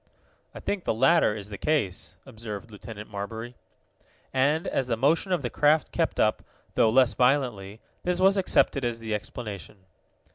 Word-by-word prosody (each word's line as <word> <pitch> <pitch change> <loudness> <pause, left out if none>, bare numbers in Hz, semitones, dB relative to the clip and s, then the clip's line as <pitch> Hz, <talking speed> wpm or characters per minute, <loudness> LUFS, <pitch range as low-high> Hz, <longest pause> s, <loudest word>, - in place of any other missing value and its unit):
"I - - -7
think 200 -3 -3
the - - 0
latter 135 -2 +4
is 105 -1 -7
the 100 - -7
case," 145 - -1
observed 110 0 -8
Lieutenant 105 0 -10
Marbury. 110 +4 -6 0.8
And, 145 +5 +2
as 130 - -1
the 115 -2 0
motion 160 - +2
of 175 -6 +1
the 120 - -3
craft 150 +1 +2
kept - - -1
up, - - +2 0.3
though 115 - +4
less 125 +1 +4
violently, 120 -6 0 0.2
this 180 0 -1
was 195 +1 +5
accepted 180 -7 +2
as 120 -1 -1
the 110 -1 -4
explanation. 105 -3 -7
120 Hz, 160 wpm, -26 LUFS, 105-145 Hz, 0.8 s, was